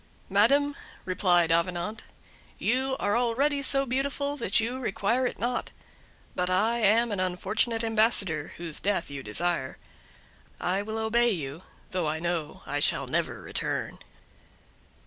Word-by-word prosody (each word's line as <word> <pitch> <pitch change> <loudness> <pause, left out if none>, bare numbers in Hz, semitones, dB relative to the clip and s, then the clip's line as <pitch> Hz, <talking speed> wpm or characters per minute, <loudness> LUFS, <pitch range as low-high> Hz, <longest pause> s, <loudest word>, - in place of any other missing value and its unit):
"Madam," 280 +9 +3 0.3
replied 175 -3 +2
Avenant, 175 +5 -1 0.5
"you 265 +3 0
are 205 - 0
already 265 +5 +1
so 275 0 +5
beautiful 280 +2 -2
that 200 -8 +1
you 240 +3 -2
require 235 +2 0
it - - -6
not; 245 +1 -2 0.6
but 180 0 -1
I 220 +6 +2
am 225 +2 +3
an 205 - -2
unfortunate 215 +5 -1
ambassador 215 -9 +3
whose 170 -3 -6
death 195 -6 -1
you 140 -1 -5
desire; 135 +4 -1 0.8
I 185 +3 0
will 220 +2 -5
obey 235 +2 +2
you, 155 -6 -4 0.3
though 180 -4 -1
I 155 +1 -2
know 170 -3 -3
I 145 - -2
shall - - +4
never - - -2
return." - - -3
210 Hz, 135 wpm, -27 LUFS, 175-240 Hz, 0.8 s, so